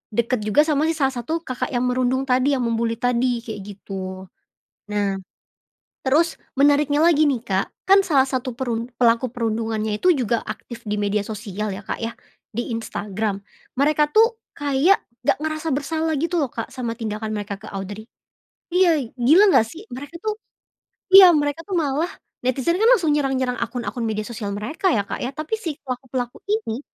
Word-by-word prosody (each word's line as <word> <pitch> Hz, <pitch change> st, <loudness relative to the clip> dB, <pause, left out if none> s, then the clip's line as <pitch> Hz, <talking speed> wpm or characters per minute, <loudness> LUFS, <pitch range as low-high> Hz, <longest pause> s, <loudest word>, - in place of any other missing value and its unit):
deket 235 Hz, +1 st, +1 dB
juga 295 Hz, +8 st, +5 dB
sama 305 Hz, 0 st, +1 dB
si 325 Hz, -, 0 dB
salah 270 Hz, -3 st, +1 dB
satu 320 Hz, +7 st, -3 dB
Kakak 255 Hz, -5 st, -3 dB
yang 245 Hz, -, +1 dB
merundung 255 Hz, +1 st, +1 dB
tadi 265 Hz, +2 st, +2 dB
yang 250 Hz, -, -1 dB
mem-bully 230 Hz, 0 st, 0 dB
tadi, 245 Hz, 0 st, 0 dB
kayak 220 Hz, -3 st, -6 dB, 0.2 s
gitu. 190 Hz, -1 st, -6 dB, 0.7 s
Nah, 200 Hz, -2 st, 0 dB, 0.9 s
terus 320 Hz, +5 st, +2 dB, 0.2 s
menariknya 290 Hz, +1 st, +4 dB
lagi 310 Hz, -3 st, +5 dB
nih 255 Hz, -5 st, 0 dB
Kak, 195 Hz, -4 st, 0 dB, 0.2 s
kan 390 Hz, +1 st, +6 dB
salah 275 Hz, -6 st, +4 dB
satu 260 Hz, -1 st, -2 dB
perun 235 Hz, -2 st, -2 dB
pelaku 235 Hz, +1 st, +4 dB
perundungannya 220 Hz, -2 st, -1 dB
itu 365 Hz, -, +3 dB
juga 235 Hz, -3 st, 0 dB
aktif 235 Hz, -2 st, -7 dB
di 210 Hz, -, 0 dB
media 205 Hz, 0 st, +1 dB
sosial 210 Hz, -1 st, -4 dB
ya 200 Hz, +1 st, -9 dB
Kak -, -, -4 dB
ya, 230 Hz, 0 st, -3 dB, 0.4 s
di 235 Hz, +2 st, -3 dB
Instagram, 210 Hz, -2 st, -3 dB, 0.4 s
mereka 300 Hz, +2 st, +3 dB
tuh 455 Hz, +1 st, +4 dB, 0.2 s
kayak 290 Hz, +7 st, +3 dB, 0.2 s
nggak -, -, +3 dB
ngerasa 310 Hz, +1 st, -2 dB
bersalah 315 Hz, +3 st, -1 dB
gitu 335 Hz, +3 st, 0 dB
loh 275 Hz, -, 0 dB
Kak 230 Hz, -1 st, -6 dB
sama 240 Hz, -3 st, -4 dB
tindakan 215 Hz, -1 st, -4 dB
mereka 205 Hz, -1 st, -5 dB
ke 220 Hz, -, -10 dB
Audrey. 200 Hz, +3 st, -7 dB, 0.6 s
Iya, 335 Hz, -9 st, +3 dB
gila 345 Hz, -, +6 dB
enggak 220 Hz, -, +5 dB
sih, 330 Hz, -, -10 dB
mereka 285 Hz, +6 st, -8 dB
tuh 430 Hz, 0 st, -2 dB, 0.8 s
iya 385 Hz, -2 st, +11 dB
mereka 290 Hz, +2 st, -1 dB
tuh 380 Hz, -1 st, -3 dB
malah 305 Hz, +3 st, 0 dB, 0.3 s
netizen 265 Hz, +7 st, +1 dB
kan 445 Hz, -, +4 dB
langsung 340 Hz, -11 st, +4 dB
nyerang 275 Hz, -2 st, +1 dB
nyerang 250 Hz, -1 st, -1 dB
akun 235 Hz, +1 st, -3 dB
akun 245 Hz, -, -3 dB
media 215 Hz, -1 st, -2 dB
sosial 215 Hz, -4 st, -5 dB
mereka 305 Hz, -, -1 dB
ya 205 Hz, -8 st, +1 dB
Kak -, -, -5 dB
ya, 250 Hz, -, -2 dB
tapi 310 Hz, +8 st, -3 dB
si 320 Hz, -6 st, -4 dB
pelaku-pelaku 250 Hz, -1 st, -4 dB
ini 415 Hz, -, -1 dB
255 Hz, 175 wpm, -22 LUFS, 225-305 Hz, 0.9 s, iya